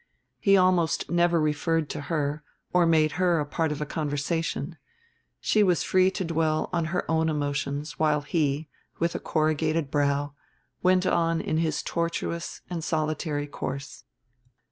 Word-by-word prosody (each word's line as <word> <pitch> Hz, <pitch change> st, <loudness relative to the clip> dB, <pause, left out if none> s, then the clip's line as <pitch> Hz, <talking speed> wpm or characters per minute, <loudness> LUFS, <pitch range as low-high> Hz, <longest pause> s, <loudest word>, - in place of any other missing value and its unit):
He 195 Hz, -2 st, +5 dB
almost 180 Hz, -5 st, +2 dB
never 175 Hz, -1 st, +3 dB
referred 155 Hz, +1 st, +1 dB
to -, -, -4 dB
her 150 Hz, 0 st, -2 dB, 0.3 s
or 180 Hz, -1 st, +4 dB
made 155 Hz, -2 st, +4 dB
her 170 Hz, -5 st, +3 dB
part 160 Hz, +1 st, -1 dB
of 150 Hz, -, -4 dB
a -, -, -1 dB
conversation; 155 Hz, +2 st, -2 dB, 0.6 s
she 215 Hz, -, +2 dB
was 180 Hz, -4 st, +3 dB
free 185 Hz, 0 st, +4 dB
to 190 Hz, 0 st, -3 dB
dwell 160 Hz, -1 st, 0 dB
on 170 Hz, -2 st, +1 dB
her 175 Hz, +3 st, -2 dB
own 160 Hz, 0 st, +2 dB
emotions 145 Hz, 0 st, -2 dB
while 150 Hz, -1 st, +2 dB
he, 145 Hz, 0 st, -1 dB, 0.3 s
with 170 Hz, +1 st, 0 dB
a -, -, -3 dB
corrugated 155 Hz, -1 st, 0 dB
brow, 145 Hz, 0 st, +1 dB, 0.5 s
went 185 Hz, 0 st, +3 dB
on 165 Hz, -2 st, +2 dB
in 155 Hz, -, -1 dB
his 160 Hz, -2 st, 0 dB
tortuous 170 Hz, 0 st, -3 dB
and 170 Hz, -3 st, -4 dB
solitary 155 Hz, -2 st, -1 dB
course. 140 Hz, -1 st, -6 dB
160 Hz, 145 wpm, -26 LUFS, 150-170 Hz, 0.6 s, He